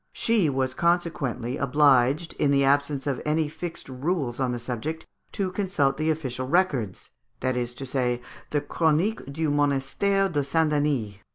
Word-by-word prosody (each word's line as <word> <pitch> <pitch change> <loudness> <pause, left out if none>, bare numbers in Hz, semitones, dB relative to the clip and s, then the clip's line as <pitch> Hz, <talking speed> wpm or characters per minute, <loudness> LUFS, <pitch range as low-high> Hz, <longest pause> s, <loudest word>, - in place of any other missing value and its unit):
She 220 -9 +2
was 130 -1 -1
consequently 155 -7 0
obliged, 140 +2 +3
in 145 - +3
the 140 0 +4
absence 140 0 +2
of 140 -3 -1
any 155 0 +1
fixed 165 +3 -7
rules 135 -1 -2
on 130 -2 +1
the 120 - -2
subject, 125 +7 -4 0.3
to 190 -2 -1
consult 180 -9 0
the 155 +1 0
official 130 -5 -2
records, 135 - 0 0.3
that 130 -1 0
is 120 -1 -2
to 135 - -5
say, 125 -2 0 0.3
the 145 - 0
"Chronique 165 +9 +1
du 155 +1 -1
Monastère 145 +8 +1
de 145 -1 +1
Saint 155 +2 +1
Denis." 140 -9 0
145 Hz, 160 wpm, -26 LUFS, 130-160 Hz, 0.3 s, the